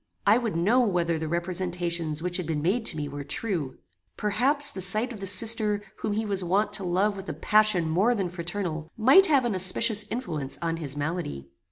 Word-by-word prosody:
I 210 +4 +4
would 230 -7 -4
know 205 +10 +2
whether 175 -8 0
the 160 - -4
representations 170 -2 -2
which 180 0 -2
had 180 -4 -5
been 150 -2 -3
made 220 +7 0
to 160 - -1
me 150 -1 -4
were 145 0 -7
true. 160 -3 -4 0.4
Perhaps 270 +8 +3
the 190 - -7
sight 215 +7 +2
of 215 - -10
the 195 - -2
sister 210 +1 +4
whom 215 - -3
he 220 +2 -2
was 195 -3 -1
wont 205 +4 0
to 210 - -1
love 190 +4 0
with 195 0 -9
a - - -3
passion 215 -6 +2
more 195 +10 +1
than 195 -4 -2
fraternal, 170 -2 -5
might 270 - +6
have 280 -5 +3
an 235 - -1
auspicious 205 +4 +2
influence 155 - -5
on 165 -1 -3
his 145 -3 -6
malady. 145 - -5
185 Hz, 205 wpm, -25 LUFS, 165-215 Hz, 0.4 s, might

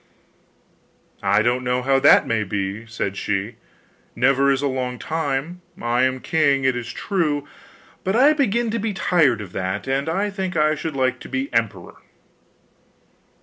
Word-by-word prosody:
'I 105 +1 +3
don't 125 +2 +1
know 125 0 0
how 135 +1 +3
that 140 - +6
may 115 -2 0
be,' 100 +2 -4
said 105 -3 -3
she; 105 +3 -2 0.6
'never 135 +2 +3
is 135 +1 0
a - - +2
long 130 -2 -3
time. 160 +3 -3 0.2
I 120 +2 +1
am 130 0 -1
king, 145 -4 +2
it 130 -1 +2
is 120 -1 -5
true; 155 -7 -1 0.6
but 190 +2 0
I 280 +6 +6
begin 235 -5 0
to 230 - -1
be 210 -1 -2
tired 145 - +2
of 95 -4 -9
that, 95 +4 -3
and 135 +3 -1
I 200 +5 -1
think 190 -3 -3
I 155 0 +3
should 155 0 -5
like 130 -1 0
to - - -11
be 130 +1 -3
emperor. 110 -6 -2
135 Hz, 165 wpm, -22 LUFS, 120-160 Hz, 0.6 s, that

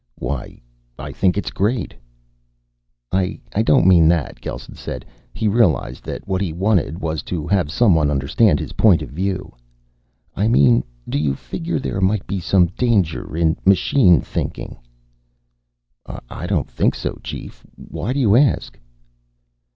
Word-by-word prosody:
"Why, 70 -3 -5 0.4
I - - -7
think 95 -1 +1
it's 100 - -2
great." 105 +2 -1 1.2
"I 95 +1 0 0.3
don't - - +4
mean 85 -4 +6
that," 80 -3 0
Gelsen - - -7
said. - - -7 0.3
He 110 - -2
realized 95 - +1
that - - -6
what 95 -1 -1
he 95 -5 -1
wanted 90 -3 0
was 80 -3 -3
to 80 -1 -4
have 95 -4 +1
someone 80 -11 +3
understand 75 - +2
his - - -6
point 100 -7 +4
of - - -9
view. 95 +4 -3 0.8
"I 105 - +1
mean 65 - +4 0.2
do - - -1
you 70 -2 0
figure 170 - -4
there 95 -7 -3
might 95 +1 +1
be 95 +1 -3
some 90 +1 +3
danger 90 -5 -1
in 80 -1 +2
machine 95 - +4
thinking?" - - -5 1.5
"I 85 - -7
don't 90 -6 0
think - - +1
so, - - -4
Chief. - - -8
Why 120 - -5
do 140 - -1
you 110 -6 +4
ask?" 125 - +2
90 Hz, 145 wpm, -20 LUFS, 80-105 Hz, 1.5 s, mean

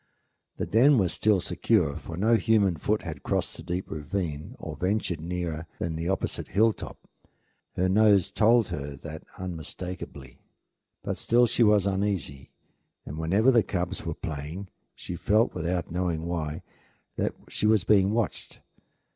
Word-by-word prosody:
The - - -1
den 130 +6 +5
was 95 -5 +2
still 105 -3 +3
secure, 90 -4 +1
for 80 - -7
no 110 +5 +3
human 110 -5 +3
foot 105 +7 -1
had 85 -3 -6
crossed - - -1
the - - -8
deep 90 +2 -3
ravine 80 - -4
or 80 -2 -7
ventured 90 -1 -1
nearer 85 -2 -4
than 85 -1 -3
the 85 +2 -2
opposite 95 - -2
hilltop. 110 +1 0 0.7
Her 90 - +2
nose 100 -1 +4
told 115 +1 +4
her 70 -4 -5
that 80 +3 -8 0.2
unmistakably; 85 -6 -7 0.6
but - - -3
still 120 +1 +4
she 120 - 0
was 105 -3 +5
uneasy, 95 -8 -1 0.6
and 75 +3 -6
whenever 100 +10 +3
the 120 -3 +5
cubs 90 -2 -3
were 85 -2 -3
playing 80 +5 -6 0.3
she 90 - -6
felt, 110 +6 +2
without 85 0 -2
knowing 85 -2 -1
why, 80 -3 -3 0.5
that - - -1
she 105 - 0
was 110 -4 +4
being 100 -1 +4
watched. 110 -4 -2
90 Hz, 150 wpm, -27 LUFS, 80-105 Hz, 0.7 s, den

